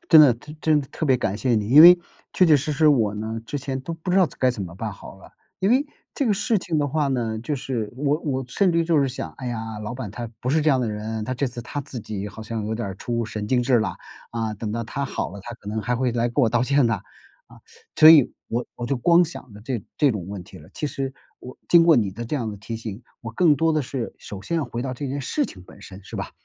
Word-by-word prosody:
真 160 -2 +9
的， 135 -6 +7
真 150 +6 -12
真 155 -2 +3
的 135 - -8
特 160 - -3
别 130 -2 +4
感 100 -4 -2
谢 125 -1 +1
你。 105 -2 0
因 140 +6 +8
为 175 +2 +11 0.4
确 185 - +4
确 160 -4 +6
实 145 +2 -2
实 155 +2 +4
我 115 -8 +3
呢， 110 +2 -4
之 - - -4
前 135 -1 -4
都 165 +6 -5
不 165 +3 -5
知 185 - +2
道 190 -2 +5
该 130 - +3
怎 120 -5 -5
么 85 -2 -7
办 105 +2 -4
好 95 - -12
了。 95 - -16 0.3
因 195 +3 +2
为 275 +4 +3 0.3
这 275 - -1
个 210 - +3
事 220 +1 +1
情 175 -2 -3
的 145 -1 +1
话 150 +1 0
呢， 120 -5 -1
就 120 +7 -3
是 125 -5 -3
我 145 +2 +1
我 135 -3 -2
甚 185 +5 +2
至 170 - +2
于 165 - +1
就 165 -3 +3
是 140 - +2
想， 130 - -5
哎 130 - -7
呀， 110 -2 -4
老 110 +3 -5
板 125 -6 -6
他 120 +2 -6
不 125 - -1
是 155 +2 +3
这 155 - +2
样 135 -3 +3
的 120 -3 -1
人， 110 +1 -4
他 130 - -3
这 130 +2 -1
次 120 -1 -6
他 145 - -5
自 130 -3 -7
己 105 -2 -5
好 110 - -10
像 110 -1 -4
有 110 - -2
点 115 -3 -3
儿 95 - -7
出 115 +1 -2
神 105 -1 -5
经 125 0 +2
质 125 -1 +3
啦。 105 -5 -2 0.4
啊， 115 -2 -2
等 105 +1 -5
到 115 - -2
他 140 +5 -4
好 135 - -3
了， 100 - -9
他 120 +5 -8
可 100 - -11
能 110 +1 -2
还 125 +3 -1
会 125 0 0
来 120 0 0
跟 130 +4 +1
我 115 - +4
道 120 +1 +1
歉 140 0 +3
的。 115 - +2 0.5
啊， - - -17 0.4
所 155 +1 +9
以 150 -6 +7 0.2
我 120 +2 -1
我 120 - -6
就 135 - 0
光 170 +8 +5
想 150 - -8
着 105 - -12
这 120 0 -3 0.2
这 145 -3 +4
种 100 -6 -4
问 100 -2 -6
题 95 - -14
了， - - -15
其 150 - -2
实 135 -1 -4 0.3
我 125 - -11
经 170 -1 +7
过 170 - +6
你 105 -7 +2
的 120 +5 -7
这 135 - -4
样 115 -6 -2
的 105 - -7
提 110 +3 -6
醒， 110 -2 -7 0.2
我 115 - -6
更 155 +6 +4
多 160 +3 +2
的 155 - +1
是 125 -2 -4
首 100 - -8
先 170 - -2
要 160 - 0
回 120 - -5
到 130 -1 -3
这 140 +3 -5
件 140 +2 -3
事 290 - -1
情 90 - -9
本 - - -16
身， 95 +1 -11
是 - - -9
吧？ - - -4
125 Hz, 315 characters per minute, -23 LUFS, 110-150 Hz, 0.5 s, 为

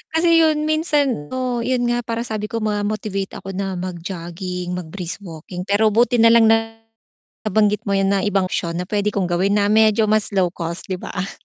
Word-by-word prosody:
kasi 335 0 +4
yun 310 -2 +3
minsan, 295 - 0
oo, 255 +1 -2
yun 250 +1 0
nga 240 - +1
parang 230 0 -2
sabi 215 -2 -4
ko 225 0 -3
ma-motivate 205 -2 -2
ako 195 - -7
na 195 0 -3
mag-jogging, 180 0 -5
mag-brisk 180 0 -5
walking 180 0 -8
pero 215 +2 +3
buti 240 +3 +3
nalang 230 0 +6
nabanggit 225 -2 -1
mo - - 0
'yan 195 0 +2
na 200 - +2
ibang 195 -2 +1
syon 170 0 -2
na 180 - -3
pwede 210 0 0
kong 190 -3 -1
gawin, 190 +4 +1
na 200 - +2
medyo 220 0 +4
mas 215 0 +1
low-cost, 175 -3 -2
'di 185 - -3
ba? 190 +1 -4
205 Hz, 180 wpm, -20 LUFS, 185-225 Hz, -, nalang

